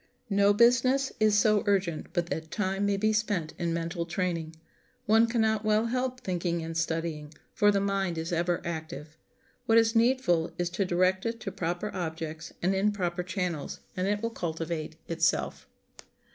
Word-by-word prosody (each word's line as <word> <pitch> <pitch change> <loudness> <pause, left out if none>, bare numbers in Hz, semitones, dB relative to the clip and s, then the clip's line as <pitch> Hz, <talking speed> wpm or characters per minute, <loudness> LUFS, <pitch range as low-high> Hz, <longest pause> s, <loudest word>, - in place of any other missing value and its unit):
No 200 0 +5
business 250 +5 +4
is 215 -1 +4
so 210 0 +4
urgent 190 -5 0
but 175 - 0
that 160 0 -3
time 195 +1 -1
may 200 -1 +1
be 215 +2 +2
spent 205 -7 -1
in 170 -1 -1
mental 170 +1 -2
training. 165 -2 -2 0.5
One 225 +2 +5
can 230 0 0
not 220 -1 +1
well 215 +1 +2
help 255 +2 -2
thinking 170 -2 -2
and 165 0 -5
studying; 160 -2 -2 0.2
for 205 -1 +4
the 200 -1 +3
mind 195 -3 -1
is 160 +1 -3
ever 175 +1 0
active. 160 -2 -6 0.5
What 225 - +5
is 225 0 +4
needful 225 -9 +2
is 175 0 -1
to 195 +2 0
direct 185 +3 +1
it 230 0 -3
to 195 - -4
proper 180 +2 -3
objects 160 -2 -5
and 185 +2 +3
in 195 +2 +2
proper 180 -3 -2
channels, 180 -4 -3 0.2
and 185 +1 -1
it 205 +2 -1
will 230 - -1
cultivate 165 -4 -4
itself. 165 0 0
185 Hz, 170 wpm, -28 LUFS, 165-215 Hz, 0.5 s, No